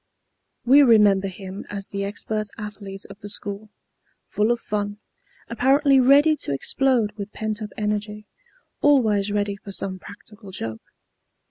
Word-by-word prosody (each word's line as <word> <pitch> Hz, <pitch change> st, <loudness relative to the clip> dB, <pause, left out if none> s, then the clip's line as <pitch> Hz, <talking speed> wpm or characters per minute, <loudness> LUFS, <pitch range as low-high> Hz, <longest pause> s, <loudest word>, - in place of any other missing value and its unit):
We 270 Hz, +4 st, +7 dB
remember 210 Hz, -6 st, +5 dB
him 190 Hz, 0 st, -8 dB
as 200 Hz, -1 st, -5 dB
the 200 Hz, 0 st, -3 dB
expert 215 Hz, +1 st, -3 dB
athlete 205 Hz, -2 st, -8 dB
of 200 Hz, -, -13 dB
the 205 Hz, -, -9 dB
school, 205 Hz, +1 st, -5 dB, 0.6 s
full 210 Hz, +2 st, 0 dB
of 240 Hz, 0 st, +1 dB
fun, 205 Hz, -2 st, -3 dB, 0.5 s
apparently 270 Hz, +3 st, +3 dB
ready 285 Hz, +4 st, +5 dB
to -, -, -3 dB
explode 240 Hz, -, +1 dB
with 205 Hz, 0 st, -6 dB
pent 220 Hz, 0 st, -3 dB
up 210 Hz, -, -5 dB
energy, 210 Hz, 0 st, -3 dB, 0.6 s
always 215 Hz, -8 st, +3 dB
ready 205 Hz, -1 st, -1 dB
for 200 Hz, -, -10 dB
some 190 Hz, -1 st, -2 dB
practical 205 Hz, +1 st, -13 dB
joke. 115 Hz, -12 st, -6 dB
210 Hz, 140 wpm, -23 LUFS, 200-230 Hz, 0.6 s, We